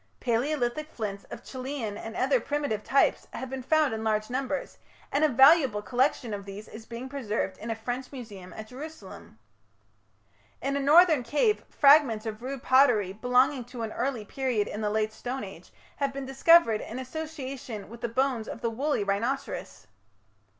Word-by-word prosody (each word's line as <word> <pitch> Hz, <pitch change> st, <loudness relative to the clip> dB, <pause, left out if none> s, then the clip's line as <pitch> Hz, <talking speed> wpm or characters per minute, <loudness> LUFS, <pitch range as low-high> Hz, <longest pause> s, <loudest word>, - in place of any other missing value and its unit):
Palaeolithic 255 Hz, +4 st, -1 dB
flints 200 Hz, -7 st, -5 dB
of -, -, -10 dB
Chellean 255 Hz, -5 st, -5 dB
and 225 Hz, +2 st, -7 dB
other 265 Hz, 0 st, +2 dB
primitive 285 Hz, -5 st, -2 dB
types 275 Hz, -, +2 dB
have 260 Hz, 0 st, -6 dB
been 265 Hz, -1 st, -4 dB
found 305 Hz, 0 st, +2 dB
in 220 Hz, 0 st, -4 dB
large 215 Hz, +1 st, 0 dB
numbers, 270 Hz, +2 st, -3 dB, 0.3 s
and 285 Hz, -, +1 dB
a 310 Hz, -, +5 dB
valuable 265 Hz, -4 st, +5 dB
collection 250 Hz, -2 st, 0 dB
of 200 Hz, -1 st, -5 dB
these 200 Hz, +2 st, -9 dB
is 220 Hz, 0 st, -11 dB
being 235 Hz, +2 st, -6 dB
preserved 225 Hz, -8 st, -3 dB
in 225 Hz, -, -6 dB
a 225 Hz, -, -1 dB
French 245 Hz, +3 st, -5 dB
museum 210 Hz, -9 st, -9 dB
at 220 Hz, -, -8 dB
Jerusalem. 305 Hz, +5 st, -10 dB, 1.2 s
In 275 Hz, +1 st, -2 dB
a -, -, +1 dB
northern 310 Hz, +1 st, +6 dB
cave 295 Hz, -, +1 dB
fragments 275 Hz, -7 st, +5 dB
of 220 Hz, 0 st, -5 dB
rude 265 Hz, +1 st, -5 dB
pottery, 245 Hz, -8 st, +4 dB
belonging 250 Hz, +4 st, +2 dB
to 245 Hz, -1 st, -7 dB
an 220 Hz, -, -4 dB
early 245 Hz, -3 st, -2 dB
period 245 Hz, -3 st, -1 dB
in 210 Hz, -, -5 dB
the 210 Hz, -, 0 dB
Late 215 Hz, 0 st, 0 dB
Stone 255 Hz, +4 st, -5 dB
Age, 190 Hz, -3 st, -11 dB, 0.3 s
have 280 Hz, -1 st, 0 dB
been 275 Hz, 0 st, -5 dB
discovered 270 Hz, -3 st, +5 dB
in 230 Hz, -, -7 dB
association 260 Hz, -5 st, -6 dB
with 235 Hz, +2 st, -12 dB
the 235 Hz, -, -2 dB
bones 255 Hz, -2 st, 0 dB
of -, -, -7 dB
the 230 Hz, -, -1 dB
woolly 275 Hz, 0 st, 0 dB
rhinoceros. 225 Hz, +7 st, -3 dB
250 Hz, 170 wpm, -28 LUFS, 220-275 Hz, 1.2 s, northern